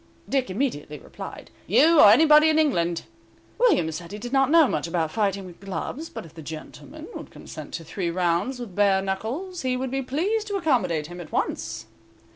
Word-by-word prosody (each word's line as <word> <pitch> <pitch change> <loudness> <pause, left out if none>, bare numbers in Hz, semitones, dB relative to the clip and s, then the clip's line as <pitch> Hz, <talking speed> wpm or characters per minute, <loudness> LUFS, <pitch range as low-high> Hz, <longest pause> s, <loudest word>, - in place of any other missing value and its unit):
Dick 265 -4 0
immediately 185 - -2
replied, - - -10 0.2
"You, 330 0 +5
or 205 - +10
anybody 300 +6 +7
in 310 - +2
England." 175 - +1 0.6
William 390 - +3
said 170 +2 -7
he 205 - -6
did 245 +4 -7
not 270 -1 +3
know 325 -1 +6
much - - -2
about 165 -2 -1
fighting 200 0 -1
with 175 -2 -12
gloves, 195 - -5
but - - -8
if 160 - -15
the 165 - -10
gentleman 155 +1 -9
would - - -8
consent - - -10
to 165 - -6
three 170 +2 -3
rounds 175 +8 0
with 235 -6 -7
bare 195 -1 +3
knuckles 250 - -4
he 255 -1 0
would 260 0 -3
be 270 0 -1
pleased 380 - -1
to 405 - -3
accommodate 230 - +1
him 175 +2 -8
at 160 - -11
once. 110 0 -2
205 Hz, 195 wpm, -25 LUFS, 170-285 Hz, 0.6 s, or